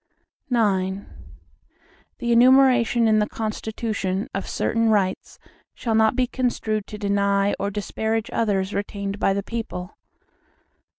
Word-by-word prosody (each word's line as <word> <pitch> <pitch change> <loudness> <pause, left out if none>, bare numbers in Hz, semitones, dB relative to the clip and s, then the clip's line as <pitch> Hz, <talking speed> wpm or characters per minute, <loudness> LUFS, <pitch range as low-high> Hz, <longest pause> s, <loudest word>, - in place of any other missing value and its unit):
IX 195 -5 +1 1.2
The 240 -2 -2
enumeration 245 -1 +5
in 215 -1 +4
the 210 - 0
Constitution, 215 -3 -3
of 195 - -4
certain 230 0 +1
rights, 195 -3 0 0.4
shall 230 - -2
not 220 +1 +3
be 255 - +2
construed 230 -4 -2
to 210 - -8
deny 200 -1 +1
or 200 - -1
disparage 220 +3 -2
others 200 -3 0
retained 200 0 -4
by 195 - +2
the 200 0 -2
people. 210 -5 -6
215 Hz, 120 wpm, -23 LUFS, 200-230 Hz, 1.2 s, enumeration